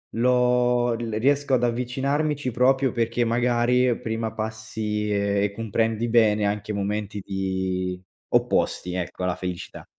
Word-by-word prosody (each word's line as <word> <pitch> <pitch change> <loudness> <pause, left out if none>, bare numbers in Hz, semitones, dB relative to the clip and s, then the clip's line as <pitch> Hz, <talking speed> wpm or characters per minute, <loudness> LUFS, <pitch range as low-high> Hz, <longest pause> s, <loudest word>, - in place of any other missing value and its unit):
lo 125 0 +3
l 115 0 -4
riesco 140 +2 +2
ad 120 - +3
avvicinarmici 135 +4 0
proprio 130 +2 +2
perché 115 +1 0
magari 120 +1 +2
prima 110 -1 -3
passi 110 -1 -3
e 100 0 +1
e 100 - 0
comprendi 115 +1 -1
bene 110 -3 +4
anche 105 +1 -2
momenti 100 0 -3
di 95 -1 -2 0.3
opposti, 90 0 +1
ecco, 90 0 -4
alla 90 -1 0
felicità. 90 -1 -6
115 Hz, 125 wpm, -24 LUFS, 100-125 Hz, 0.3 s, bene